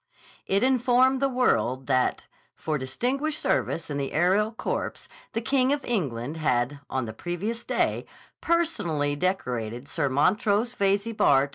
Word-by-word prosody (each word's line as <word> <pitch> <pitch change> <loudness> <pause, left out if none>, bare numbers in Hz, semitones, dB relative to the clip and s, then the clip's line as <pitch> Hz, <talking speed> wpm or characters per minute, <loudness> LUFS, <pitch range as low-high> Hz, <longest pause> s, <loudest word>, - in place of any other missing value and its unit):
It 195 +3 +2
informed 255 0 +3
the 275 - +3
world 135 - +1
that, 130 -2 +1 0.3
for 155 -2 -2
distinguished 260 - -1
service 165 - 0
in 145 - -3
the 135 -1 -3
aerial 190 +7 +3
corps, 225 - -4 0.3
the 225 - -1
King 260 +2 +2
of 285 0 -1
England 145 - -2
had, 135 -2 0
on 130 -2 -1
the 110 - -6
previous 190 - -4
day, - - 0 0.3
personally 170 - 0
decorated 125 - -2
Sir 140 - -1
Montrose 210 - +2
Veyze, 200 +1 0
Bart. 140 -6 +4
185 Hz, 140 wpm, -26 LUFS, -, 0.3 s, Bart